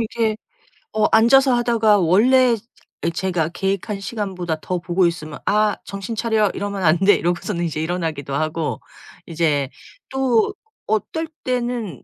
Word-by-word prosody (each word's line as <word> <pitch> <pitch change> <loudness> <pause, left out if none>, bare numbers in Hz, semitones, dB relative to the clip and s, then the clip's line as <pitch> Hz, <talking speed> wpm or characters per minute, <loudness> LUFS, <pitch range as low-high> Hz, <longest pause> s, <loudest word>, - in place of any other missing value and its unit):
이렇게 225 -1 -1 0.6
어 215 - +2
앉아서 260 +4 +5
하다가 230 -4 +3
원래 235 +8 +4 0.5
이 170 - +1
제가 170 -2 -1
계획한 195 +2 -2
시간보다 185 -6 -4
더 180 -1 -2
보고 175 +1 +1
있으면 155 -3 -3
'아, 210 0 +2
정신 200 +3 -6
차려 220 -3 +1
이러면 200 -1 -4
안 160 +1 +4
돼.' 195 0 +5
이러고서는 175 +1 -1
이제 155 -1 -3
일어나기도 160 -5 -3
하고 155 +2 -2 0.5
이제 155 -5 0 0.4
또 265 - +1 0.3
어떨 320 +10 -1 0.2
때는 240 - -3
195 Hz, 295 characters per minute, -21 LUFS, 170-225 Hz, 0.6 s, 앉아서